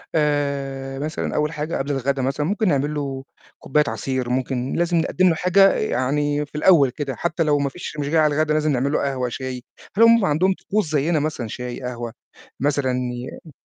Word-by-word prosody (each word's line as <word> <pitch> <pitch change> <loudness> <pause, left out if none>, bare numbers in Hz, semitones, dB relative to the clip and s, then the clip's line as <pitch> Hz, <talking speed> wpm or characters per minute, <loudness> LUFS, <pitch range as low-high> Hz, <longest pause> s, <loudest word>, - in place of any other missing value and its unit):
آآ، 140 -3 -1
مثلًا 155 +2 -3
أول 150 +1 +1
حاجة 150 +2 -3
قبل 140 +2 -2
الغدا 135 0 -1
مثلًا 135 +3 -1
ممكن 210 +3 0
نعمل 145 -1 +1
له 135 -2 -4 0.4
كوباية 150 +2 +2
عصير، 125 +3 -2
ممكن 130 0 -1
لازم 170 0 +1
نقدّم 180 +3 +2
له 165 - +2
حاجة 195 +3 +4
يعني 145 +4 0
في 150 - -20
الأول 150 -4 +5
كده، 140 -1 -4
حتّى 170 -1 -1
لو 145 -1 +2
ما 140 -1 0
فيش 155 0 -8
مش 145 0 -2
جاي 160 0 +3
على 150 -2 +3
الغدا 155 0 +1
لازم 155 0 +1
نعمل 135 +2 0
له - - +1
قهوة، 130 -3 -1
شاي، 130 -1 -5 0.3
هل 230 - +6
هُم 230 -3 +6
عندهم 185 +5 +2
طقوس 200 -5 -2
زيّنا 155 +2 +1
مثلًا 145 -6 -3
شاي، 125 +3 -6
قهوة 120 -2 -5 0.5
مثلًا 140 -2 +1 0.6
ي - - -11
145 Hz, 195 wpm, -22 LUFS, 135-155 Hz, 0.6 s, هل